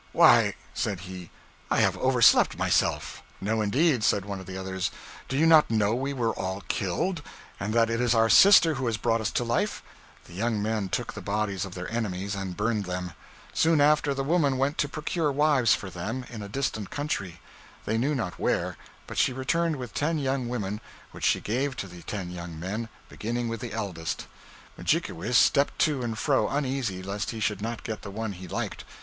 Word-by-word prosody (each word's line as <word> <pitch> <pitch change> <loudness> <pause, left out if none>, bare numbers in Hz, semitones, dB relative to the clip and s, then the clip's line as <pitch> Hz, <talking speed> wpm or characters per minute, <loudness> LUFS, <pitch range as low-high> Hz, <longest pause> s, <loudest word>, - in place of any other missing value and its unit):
'Why,' - - +6 0.2
said 100 -5 -2
he, 95 -2 -8 0.4
'I - - +3
have - - +2
overslept 130 -3 +5
myself.' - - 0 0.2
'No, 110 +3 0
indeed,' 125 +4 +2
said 100 -2 +2
one 100 -1 -5
of 95 - -10
the 95 0 -6
others, 95 -1 -2 0.4
'do 135 - -1
you 155 - +4
not 160 -2 +6
know 110 -1 +2
we 135 +3 -1
were 120 -5 0
all 95 +1 -4
killed, 145 - -1 0.4
and 100 +1 -2
that 115 -1 +4
it 115 +1 -1
is 120 -1 +3
our 115 0 +4
sister 170 - +7
who 130 -3 -2
has 115 -2 0
brought 115 +1 +1
us 110 - 0
to - - -1
life?' 120 0 -1 0.4
The - - -14
young 110 +3 -1
men 105 -2 -1
took - - -2
the - - -7
bodies 100 -2 -1
of 95 - -9
their 90 -1 -5
enemies 100 -3 -2
and 95 -3 -4
burned 105 -1 0
them. 90 -1 -4 0.4
Soon 160 -1 +3
after, 145 -1 +3
the 135 - -1
woman 145 -3 +2
went 135 +3 0
to 145 - +1
procure 155 +1 -1
wives 140 -5 +4
for 95 - -7
them, 110 +9 -4
in 115 -3 -7
a 100 - -7
distant 110 -4 -2
country, 100 - -3 0.5
they 110 +1 0
knew 145 +5 +1
not 90 -8 -3
where; - - 0 0.3
but - - -4
she - - +3
returned 165 +5 0
with 125 -6 -7
ten 160 +3 0
young 135 -3 -1
women, 105 -3 -3 0.3
which - - -4
she - - +3
gave 130 +5 -1
to 100 - -5
the 90 -2 -11
ten 95 -3 -5
young 85 -2 -7
men, 105 +6 -4 0.2
beginning 120 +2 -3
with 115 -1 -4
the 120 +1 -6
eldest. 95 -7 -4 0.5
Mudjikewis 110 +9 +1
stepped 140 -1 +4
to 150 -5 +2
and 115 -2 -3
fro, 140 +3 +2
uneasy 130 -9 -2
lest 100 +3 -3
he 115 - -5
should 105 -2 -1
not 115 +1 -4
get 110 -2 -5
the - - -7
one 110 +1 -4
he 90 -1 -9
liked. - - -4
115 Hz, 205 wpm, -27 LUFS, 100-135 Hz, 0.5 s, sister